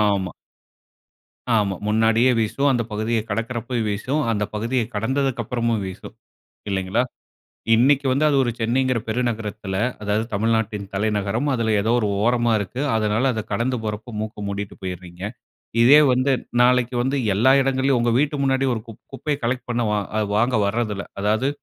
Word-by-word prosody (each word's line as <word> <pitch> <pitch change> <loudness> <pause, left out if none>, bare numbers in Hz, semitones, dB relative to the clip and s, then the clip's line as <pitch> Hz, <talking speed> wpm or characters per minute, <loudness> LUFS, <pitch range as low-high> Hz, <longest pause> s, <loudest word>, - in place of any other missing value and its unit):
ஆமா. 95 -2 -3 1.2
ஆமா, 105 -3 +2
முன்னாடியே 110 +3 +3
வீசும். 115 +6 +1
அந்த 120 -2 +1
பகுதியை 110 +1 0
கடக்கிறப்ப 115 +3 -3
வீசும். 125 +9 -1
அந்த 105 -2 0
பகுதியை 115 +3 0
கடந்ததுக்கப்புறமும் 120 -1 -1
வீசும். 95 -1 -9 0.5
இல்லைங்களா, 95 +3 0 0.7
இன்னைக்கு 135 +4 +3
வந்து 140 +4 +2
அது 145 - +2
ஒரு 120 - 0
சென்னைங்கிற 125 +2 +1
பெருநகரத்தில 110 -4 -2 0.3
அதாவது 105 +1 0
தமிழ்நாட்டின் 110 -1 0
தலைநகரம். 105 +5 0
அதில 115 -3 0
ஏதோ 110 +3 0
ஒரு 110 - 0 0.2
ஓரமா 120 0 +2
இருக்கு. 105 +6 -4
அதனால, 110 +2 +1
அத 110 - -2
கடந்து 120 +5 0
போறப்ப 110 +2 -5
மூக்க 110 -1 -6
மூடிட்டு 100 0 -5
போயிடுறீங்க. 90 -1 -7 0.6
இதே 135 +6 +8
வந்து 130 +2 +2 0.3
நாளைக்கு 125 0 +3
வந்து 135 +3 0 0.2
எல்லா 115 +7 +4
இடங்கள்லயும், 135 -1 +1
உங்க 120 0 +2
வீட்டு 150 +1 +1
முன்னாடி 135 0 +2
ஒரு 110 - -3
குப் 115 -1 -12
குப்பைய 145 +2 -2
கலெக்ட் 125 +1 -2
பண்ண 120 0 0 0.3
அது 110 - +1
வாங்க 120 +3 +2
வர்றதில்ல. 105 -2 -2 0.2
அதாவது, 110 +6 +1
115 Hz, 145 wpm, -22 LUFS, 105-125 Hz, 1.2 s, இதே